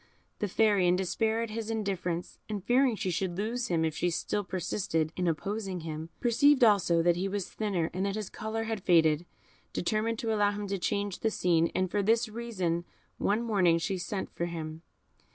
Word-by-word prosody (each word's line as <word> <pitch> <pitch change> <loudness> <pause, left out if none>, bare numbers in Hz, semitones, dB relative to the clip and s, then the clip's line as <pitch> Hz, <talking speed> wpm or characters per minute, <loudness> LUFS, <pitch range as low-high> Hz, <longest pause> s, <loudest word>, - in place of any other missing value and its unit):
The 210 - 0
Fairy, 205 -2 +3
in 175 - +4
despair 220 +5 0
at 230 - -5
his 225 0 -4
indifference, 190 -6 -3
and 205 -3 -3
fearing 250 +2 +3
she 190 -3 -2
should 175 0 -2
lose 235 +4 -1
him 165 -2 +1
if 160 -1 -2
she 175 - +1
still 205 +4 -1
persisted 170 -3 -1
in 180 -1 -1
opposing 195 +2 -2
him, 160 0 -5
perceiving 255 +2 +5
also 180 -5 +3
that 175 0 +3
he 190 +2 -1
was 195 -1 -3
thinner, 195 -7 -1
and 190 +3 -1
that 200 - -2
his 215 -3 -4
colour 220 +1 -3
had 220 -2 -3
faded, 165 -2 +3 0.5
determined 220 +4 0
to 225 -1 -1
allow 205 -1 +2
him 205 0 -4
to 195 -1 -1
change 200 0 -1
the 225 - +1
scene, 170 -5 +2
and 185 0 0
for 205 - +1
this 225 +4 +3
reason 210 -7 -2 0.4
one 215 +4 +1
morning 190 -7 +3
she 185 +3 -2
sent 190 +3 -4
for 170 - -2
him. 160 -1 -6
195 Hz, 195 wpm, -30 LUFS, 175-220 Hz, 0.5 s, perceiving